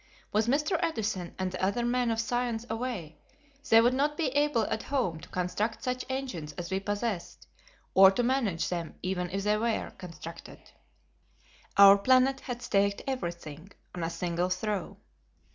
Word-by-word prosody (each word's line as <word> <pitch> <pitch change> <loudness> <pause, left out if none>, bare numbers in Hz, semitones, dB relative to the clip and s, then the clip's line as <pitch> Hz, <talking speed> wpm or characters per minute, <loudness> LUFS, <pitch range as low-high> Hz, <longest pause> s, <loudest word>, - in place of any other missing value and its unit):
With 215 +2 +1
Mr. 300 +7 +1
Edison 215 - -2
and 185 -1 -2
the 185 0 -5
other 200 +5 +1
men 245 0 +1
of 225 -1 0
science 240 0 -1
away, 225 -9 -4 0.5
they 225 0 +8
would 240 +2 +3
not 295 +3 0
be 315 -5 +1
able 290 -3 +2
at 220 - -2
home 235 - -1
to 170 +2 -13
construct 185 +5 -2
such 250 0 -2
engines 250 - -4
as 170 +4 -6
we 190 - +1
possessed, 205 -2 -3 0.5
or 190 0 +9
to 195 +6 0
manage 235 -9 0
them 170 -2 -4
even 180 -1 -2
if 195 +2 -3
they 210 +1 +2
were 225 0 -1
constructed. 170 -2 -10 1.1
Our 200 0 +9
planet 260 +4 +4
had 245 -2 -6
staked 200 0 +1
everything 170 - -5 0.2
on 175 - -4
a 165 - -1
single 170 +1 -1
throw. 195 +1 -2
210 Hz, 160 wpm, -29 LUFS, 180-250 Hz, 1.1 s, or